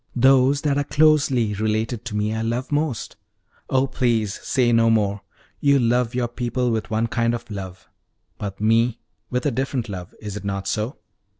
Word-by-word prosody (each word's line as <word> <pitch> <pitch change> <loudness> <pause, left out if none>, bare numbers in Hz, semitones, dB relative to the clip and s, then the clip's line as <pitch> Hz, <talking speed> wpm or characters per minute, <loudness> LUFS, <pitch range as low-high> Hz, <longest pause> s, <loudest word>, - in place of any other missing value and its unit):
Those 135 +2 +4
that 145 -2 +1
are - - +1
closely 140 -8 +3
related 110 +2 -1
to 105 - -5
me 105 +1 0
I 110 - -2
love 120 +4 -2
most." 145 -4 -2 0.5
"Oh, 130 0 +3
please 120 -6 0
say 125 -2 +1
no 115 0 +4
more! 105 -3 +1 0.4
You 140 -1 +4
love 120 -1 +1
your 125 -1 0
people 120 +1 -1
with 110 0 -2
one 110 0 +1
kind 115 0 0
of 115 - -9
love, 95 -2 -7 0.5
but 100 -2 -5
me 115 +2 +2 0.3
with 125 0 -2
a 145 - +2
different 130 -2 -2
love 90 -3 -7
is 105 -2 -6
it 105 - -6
not 100 -1 -3
so?" 110 +6 -2
115 Hz, 180 wpm, -22 LUFS, 110-130 Hz, 0.5 s, Those